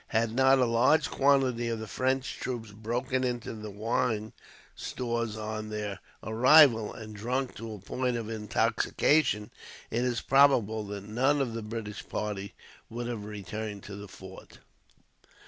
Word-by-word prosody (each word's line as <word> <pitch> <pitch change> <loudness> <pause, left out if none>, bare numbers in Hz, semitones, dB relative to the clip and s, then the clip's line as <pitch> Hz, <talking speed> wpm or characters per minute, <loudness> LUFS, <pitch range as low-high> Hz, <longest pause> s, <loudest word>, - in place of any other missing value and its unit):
Had 115 0 0
not 135 +2 +5
a 130 - +4
large 115 +7 +3
quantity 135 -4 +3
of 115 -1 -1
the 110 - -5
French 130 +6 -1
troops 120 -4 -4
broken 120 +5 -2
into 120 -3 -2
the 110 -1 -7
wine 110 +1 -1 0.4
stores 115 -3 -3
on 110 0 -4
their 105 -2 -4 0.2
arrival, 115 0 +6
and 110 -1 -9
drunk 125 +5 -2
to 115 -1 -6
a - - -10
point 125 +5 -2
of 115 -2 -4
intoxication, 110 +2 +1 0.4
it 120 - 0
is 125 -2 0
probable 125 -6 +4
that 100 -1 -6
none 130 +7 +2
of 130 -4 -1
the 115 - -4
British 105 -1 -6
party 100 -1 -4 0.3
would 120 +1 -5
have 115 -4 -4
returned 105 0 -6
to 100 - -8
the 100 0 -8
fort. 95 0 -12
115 Hz, 150 wpm, -29 LUFS, 105-125 Hz, 0.4 s, arrival